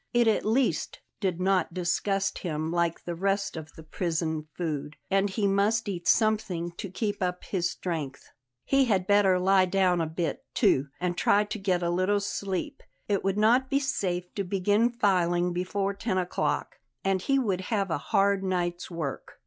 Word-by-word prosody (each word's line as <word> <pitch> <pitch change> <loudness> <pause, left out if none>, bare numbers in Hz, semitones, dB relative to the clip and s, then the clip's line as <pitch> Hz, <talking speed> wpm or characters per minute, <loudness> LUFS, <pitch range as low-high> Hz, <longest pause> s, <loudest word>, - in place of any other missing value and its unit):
It 240 -1 +4
at 220 - +2
least 240 +4 0 0.2
did 185 -4 -1
not 185 -2 +1
disgust 195 +2 0
him 160 -2 -3
like 170 -1 0
the 175 - -3
rest 195 +3 -1
of 160 -1 -8
the 160 - -12
prison 160 -1 -2
food, 150 -3 -3 0.2
and 195 +1 +3
he 205 +2 -1
must 205 +3 +2
eat 175 -4 -4
something 210 -6 +2
to 200 - -5
keep 205 +2 -3
up 180 -1 -2
his 175 -3 -1
strength. 155 -7 -5 0.3
He 275 -1 +3
had 195 -6 +1
better 200 -2 +4
lie 190 0 +4
down 180 -2 +2
a 160 - -1
bit, 160 -1 -3
too, 135 +2 +3
and 180 -1 -1
try 205 +3 +3
to 210 +1 -5
get 185 -3 0
a 170 - +1
little 185 +4 +2
sleep; 200 - -3 0.3
it 200 -2 0
would 195 +1 0
not 240 +5 +3
be 275 - +2
safe 180 -10 -2
to 200 - -2
begin 205 +5 +2
filing 180 -6 +1
before 195 +3 -1
ten 200 -1 -2
o'clock, 185 - -1 0.2
and 195 -1 +1
he 275 +7 +2
would 200 -8 0
have 200 -5 0
a 160 - 0
hard 200 +2 +2
night's 175 -2 -2
work. 160 -6 -5
190 Hz, 180 wpm, -27 LUFS, 175-205 Hz, 0.3 s, It